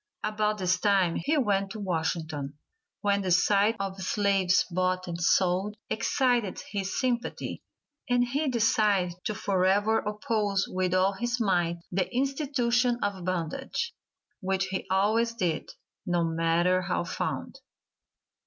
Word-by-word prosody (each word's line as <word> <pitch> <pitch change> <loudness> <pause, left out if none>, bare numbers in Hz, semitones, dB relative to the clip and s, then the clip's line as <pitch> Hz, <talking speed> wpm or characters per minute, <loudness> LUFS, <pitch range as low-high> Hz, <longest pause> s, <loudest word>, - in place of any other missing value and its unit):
About 215 0 0
this 185 -1 +1
time 190 -4 +3
he 305 +2 0
went 200 -7 +1
to 220 - -7
Washington, 160 -6 -2 0.5
when 200 -1 +2
the 190 - -2
sight 200 +4 +3
of 195 -1 -4
slaves 195 -1 +2
bought 185 +1 0
and 170 0 -5
sold 190 +4 +2
excited 235 -2 +1
his 195 -2 -2
sympathy, 250 -1 -2 0.5
and 245 0 +3
he 280 +5 -1
decided 210 -7 +2
to 215 - -1
forever 200 +3 +2
oppose 210 -2 -1
with 185 0 -1
all 190 +2 +3
his 240 +5 -2
might 175 -5 +1
the 185 0 -1
institution 250 -2 +1
of 195 -3 -2
bondage, 185 - -3 0.5
which 190 -1 0
he 190 - -3
always 220 +5 +2
did, 175 -8 -1 0.4
no 175 -1 +1
matter 165 +2 +2
how 180 -1 -1
found. 175 - -4
195 Hz, 130 wpm, -28 LUFS, 185-225 Hz, 0.5 s, time